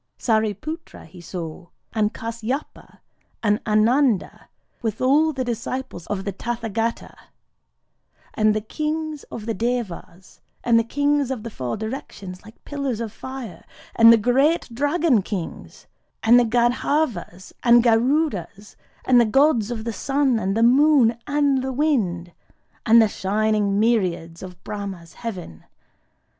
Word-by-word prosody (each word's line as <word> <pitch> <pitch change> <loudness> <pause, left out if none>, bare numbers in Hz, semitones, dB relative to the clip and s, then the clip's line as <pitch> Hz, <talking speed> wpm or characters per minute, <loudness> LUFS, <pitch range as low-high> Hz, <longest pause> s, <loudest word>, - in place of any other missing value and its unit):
Sâriputra 220 - -2
he 170 +2 -14
saw, 170 0 -7 0.3
and 215 -1 +1
Kâsyapa, 230 +5 -6 0.4
and 210 0 +1
Ânanda, 225 +1 +2 0.4
with 220 -3 -3
all 295 +5 +3
the 265 -3 -3
disciples 240 -5 -5
of 195 -2 -3
the 200 - -3
Tathâgata,—and 225 -1 -5
the 215 - -1
Kings 305 +5 -4
of 215 - -8
the 225 - -1
Devas,—and 230 0 -2
the - - +1
Kings 285 +2 0
of 255 -5 -4
the 230 - -6
Four 125 - -4
Directions, 205 -5 -7
like 220 +2 -17
pillars 275 -5 -3
of 225 -2 -5
fire,—and 230 -2 +1
the 230 - +7
great 270 +9 +2
Dragon 290 - +2
Kings,—and 210 +5 -1
the 245 - +3
Gandharvas 240 - -1
and 235 -1 +6
Garudas,—and 240 - 0
the - - +4
Gods 240 -1 +3
of 230 -3 -4
the 230 0 -3
Sun 270 -1 +1
and 195 +1 -1
the 225 - +3
Moon 260 -1 +5
and 285 -2 +2
the 265 +1 -3
Wind,—and 225 - 0
the 220 - +5
shining 205 0 0
myriads 185 -7 0
of 180 -2 -11
Brahmâ's 195 -5 -7
heaven. 185 - -8
230 Hz, 125 wpm, -22 LUFS, 205-265 Hz, 0.4 s, the